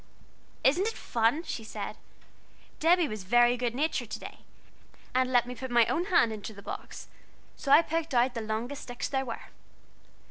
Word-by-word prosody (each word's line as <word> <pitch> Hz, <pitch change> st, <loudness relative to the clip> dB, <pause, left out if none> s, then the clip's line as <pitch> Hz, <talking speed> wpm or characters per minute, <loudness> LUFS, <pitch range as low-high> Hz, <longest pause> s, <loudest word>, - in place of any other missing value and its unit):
"Isn't 350 Hz, +10 st, +3 dB
it 450 Hz, -, -3 dB
fun?" 235 Hz, +8 st, +1 dB
she 245 Hz, -8 st, -5 dB
said. 220 Hz, -, -6 dB, 0.8 s
"Debby 340 Hz, +1 st, +4 dB
was 210 Hz, -5 st, -7 dB
real 240 Hz, 0 st, +6 dB
good 245 Hz, -1 st, -2 dB
natured 305 Hz, +5 st, -1 dB
to -, -, -5 dB
day, -, -, -10 dB, 0.7 s
and 255 Hz, 0 st, +2 dB
let 245 Hz, -2 st, +4 dB
me 250 Hz, -, -6 dB
put 260 Hz, +2 st, -6 dB
my 240 Hz, -1 st, +5 dB
own 345 Hz, +9 st, 0 dB
hand 335 Hz, -, +3 dB
into 215 Hz, +1 st, -7 dB
the 200 Hz, -, -12 dB
box, -, -, -7 dB, 0.5 s
so 275 Hz, -, -3 dB
I 330 Hz, -, +8 dB
picked 325 Hz, -3 st, -2 dB
out 245 Hz, +1 st, +3 dB
the 230 Hz, -, -3 dB
longest 225 Hz, +6 st, -3 dB
sticks 245 Hz, 0 st, -4 dB
there 265 Hz, -1 st, -1 dB
were. 230 Hz, -, -7 dB
250 Hz, 180 wpm, -29 LUFS, 230-300 Hz, 0.8 s, I